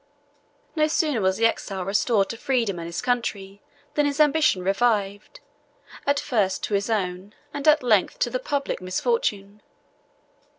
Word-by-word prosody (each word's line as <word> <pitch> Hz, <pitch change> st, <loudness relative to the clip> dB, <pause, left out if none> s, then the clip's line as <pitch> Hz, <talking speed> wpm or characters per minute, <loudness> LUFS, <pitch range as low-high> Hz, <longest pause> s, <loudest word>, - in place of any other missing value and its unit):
No 305 Hz, -1 st, +3 dB
sooner 305 Hz, -6 st, 0 dB
was 190 Hz, 0 st, +1 dB
the 230 Hz, -, +2 dB
exile 195 Hz, -4 st, -1 dB
restored 200 Hz, +1 st, +1 dB
to -, -, -4 dB
freedom 230 Hz, -8 st, -1 dB
and 165 Hz, -, -6 dB
his 170 Hz, +5 st, -5 dB
country, 205 Hz, -5 st, -2 dB, 0.3 s
than 295 Hz, -1 st, +2 dB
his 285 Hz, +1 st, -3 dB
ambition 300 Hz, -10 st, +3 dB
revived, 205 Hz, -, 0 dB, 0.7 s
at 285 Hz, 0 st, +2 dB
first 200 Hz, -8 st, 0 dB
to -, -, -3 dB
his 200 Hz, +2 st, 0 dB
own, 190 Hz, -2 st, -2 dB, 0.2 s
and 285 Hz, +1 st, -4 dB
at 305 Hz, -2 st, +5 dB
length 220 Hz, -, +2 dB
to -, -, +1 dB
the -, -, -1 dB
public, 285 Hz, -, -3 dB
misfortune. 200 Hz, -, -2 dB
220 Hz, 155 wpm, -24 LUFS, 195-285 Hz, 0.7 s, at